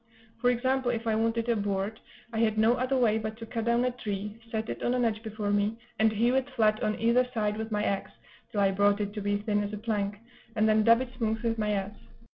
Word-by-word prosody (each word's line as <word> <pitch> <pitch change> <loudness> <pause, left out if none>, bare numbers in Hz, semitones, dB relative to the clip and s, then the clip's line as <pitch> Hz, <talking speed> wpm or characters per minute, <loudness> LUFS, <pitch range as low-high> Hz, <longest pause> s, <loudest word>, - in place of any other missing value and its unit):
For 245 +1 +3
example, 260 +1 +1
if 230 -1 -2
I 225 - +1
wanted 230 +1 0
a 235 - +2
board, 205 +1 -2 0.3
I 220 - -1
had 220 -1 +2
no 220 +2 +5
other 255 +2 0
way 225 -3 +3
but 220 0 -5
to 230 - -7
cut 225 0 -4
down 235 +1 +2
a 250 - +1
tree, 210 -2 -5
set 220 -1 -2
it - - -5
on 245 - +1
an 245 -1 +2
edge 220 -1 -1
before 215 -2 -3
me, 205 +2 +1 0.2
and 220 0 +4
hew 230 +3 +2
it 265 +1 +1
flat 215 -2 +3
on 215 0 -1
either 235 +2 +3
side 210 -1 0
with 220 +1 -5
my 210 0 0
axe, 195 -2 -2 0.4
till 205 - 0
I 195 -1 +4
brought 200 +1 +3
it 205 -1 -2
to 210 - -4
be 205 0 0
thin 205 0 0
as 205 +1 -5
a - - -3
plank, 205 -2 -2 0.4
and 215 0 +3
then 215 0 +4
dub 230 +2 +6
it 260 - -4
smooth 225 -1 -1
with 225 -1 0
my 210 -1 +1
adze. 200 +1 -3
220 Hz, 260 wpm, -28 LUFS, 210-235 Hz, 0.4 s, dub